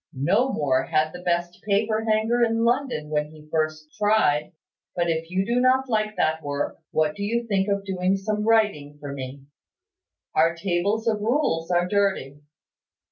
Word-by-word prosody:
"No 195 - +2
more 135 - +1
had 155 -1 +1
the 180 - -8
best 175 0 -1
paper 215 +2 0
hanger 220 +3 +2
in 230 0 +1
London 240 - 0
when 150 0 0
he 155 -1 -15
first 155 -1 -2
tried. 205 -9 +2 0.4
But 170 -1 +1
if 165 0 -3
you 190 +2 0
do 240 +3 +1
not 260 +1 +3
like 215 -2 0
that 160 0 +1
work, 145 -1 -3
what 155 -1 +1
do - - -8
you 235 +4 -1
think 195 -3 0
of 200 0 -1
doing 190 0 0
some 210 +2 -2
writing 210 -11 +1
for 145 -1 -6
me? 135 0 -7 0.9
Our 165 +2 +3
tables 195 +6 -1
of 215 -2 +1
rules 215 - 0
are 175 0 +2
dirty. 190 -8 0
185 Hz, 170 wpm, -24 LUFS, 155-220 Hz, 0.9 s, not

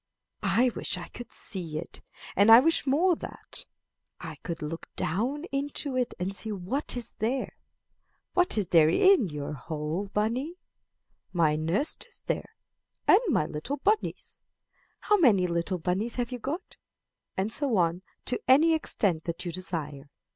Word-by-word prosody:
I 225 +6 +3
wish - - -2
I - - -8
could 240 0 -10
see 170 -7 -3
it, 165 - -7 0.3
and 205 +3 +6
I 225 - +12
wish 320 +1 +2
more 335 +7 +4
that - - -5 0.5
I - - -7
could 170 -2 -6
look 165 +2 -6
down 250 - -1
into 280 0 -2
it 250 -1 0
and 190 +2 -2
see 220 +2 -4
what 210 +9 -2
is 235 -2 -3
there. 250 +4 -1 0.8
What 360 -9 +3
is 200 -5 0
there 160 -2 +6
in 355 - +5
your 150 -1 -5
hole, 155 +6 -4
bunny? 240 +11 -1 0.8
My 160 -4 +3
nest 165 - 0
is 475 - -15
there, - - -2 0.6
and 395 - +7
my 225 - +2
little 160 - -4
bunnies. 420 +8 -1 0.6
How 420 - +3
many 210 - +5
little 170 +2 -1
bunnies 185 +7 -1
have 245 0 -2
you 250 - -4
got?'" 300 +10 -5 0.6
And 200 +4 0
so 275 -7 0
on, 170 0 +1 0.2
to 250 - 0
any 310 +6 +6
extent 195 - 0
that 170 +1 -4
you 175 - -2
desire. 155 -6 -5
210 Hz, 155 wpm, -28 LUFS, 170-270 Hz, 0.8 s, I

